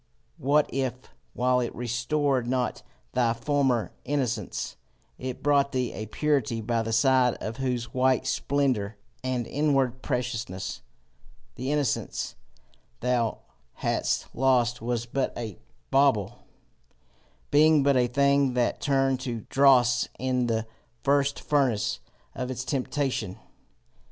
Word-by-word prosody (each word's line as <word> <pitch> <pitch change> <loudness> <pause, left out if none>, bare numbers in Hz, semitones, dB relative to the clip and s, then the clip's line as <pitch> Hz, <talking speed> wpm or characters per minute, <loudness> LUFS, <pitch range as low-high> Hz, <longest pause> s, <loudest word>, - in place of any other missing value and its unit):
What 145 +3 +3
if, 130 -2 0 0.4
while 125 +1 +2
it 120 - -3
restored 125 +2 0
not 125 0 -1 0.3
thy 120 -2 +2
former 130 -1 +1
innocence, 125 -8 -2 0.4
it 130 -1 -5
brought 140 -1 +3
thee 125 -2 -1
a 110 - -5
purity 130 -2 0
by 115 +1 0
the 115 0 -3
side 125 +1 +4
of 110 +3 -6
whose 125 -4 -2
white 130 0 +2
splendour 125 -8 0 0.3
and 130 -2 -1
inward 135 -3 +1
preciousness, 115 -8 -3 0.7
the 130 - -3
innocence 145 -5 -1 0.7
thou 120 -2 0 0.3
hadst - - -1
lost 120 -2 +2
was 120 0 -1
but 130 +3 -2
a 110 -5 -6 0.3
bauble, 135 -8 +2 1.0
being 150 0 +5
but 140 0 +4
a 125 -1 +3
thing 140 0 +2
that 120 -1 0
turned 135 -2 +2
to 120 -4 -4
dross 125 -3 +5
in 125 -1 0
the 110 -1 0 0.4
first 140 0 +2
furnace 135 -8 +1 0.3
of 125 0 -4
its 125 0 -4
temptation? 130 -7 -2
125 Hz, 120 wpm, -27 LUFS, 120-140 Hz, 1.0 s, being